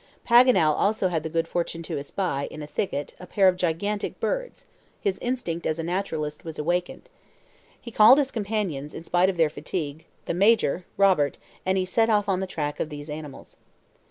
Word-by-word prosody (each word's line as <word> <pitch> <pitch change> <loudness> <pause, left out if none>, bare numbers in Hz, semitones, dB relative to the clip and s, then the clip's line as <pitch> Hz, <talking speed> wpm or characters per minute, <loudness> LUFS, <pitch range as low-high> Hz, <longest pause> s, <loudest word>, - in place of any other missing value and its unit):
Paganel 235 -10 +6
also 200 +2 +1
had 165 -3 -1
the 160 - -5
good 165 +1 -1
fortune 170 -1 -3
to 160 -3 -4
espy, 140 -1 -2
in 155 - -8
a - - -5
thicket, 145 -2 -3
a 180 - -10
pair 195 0 +3
of 185 - +4
gigantic 185 +4 -2
birds; - - -3 0.3
his 195 -2 -1
instinct 240 -10 -3
as 155 - -1
a 165 - -3
naturalist 160 -4 -3
was 160 -2 -7
awakened. 175 - -2 0.7
He 235 - -10
called 220 +4 +7
his 275 -2 +1
companions, 200 - -3
and - - -6
in - - -14
spite 175 +2 +2
of 185 - -3
their 160 -2 +3
fatigue, 155 -1 -5 0.2
the - - -2
Major, 185 -3 +3
Robert, 185 -8 +3 0.3
and 190 0 +2
he 185 - +1
set 225 +5 +2
off 210 -2 +2
on 190 -2 +1
the 190 - -3
track 150 -4 -4
of 155 - -2
these 145 0 -8
animals. 150 -3 -9
180 Hz, 195 wpm, -25 LUFS, 155-205 Hz, 0.7 s, called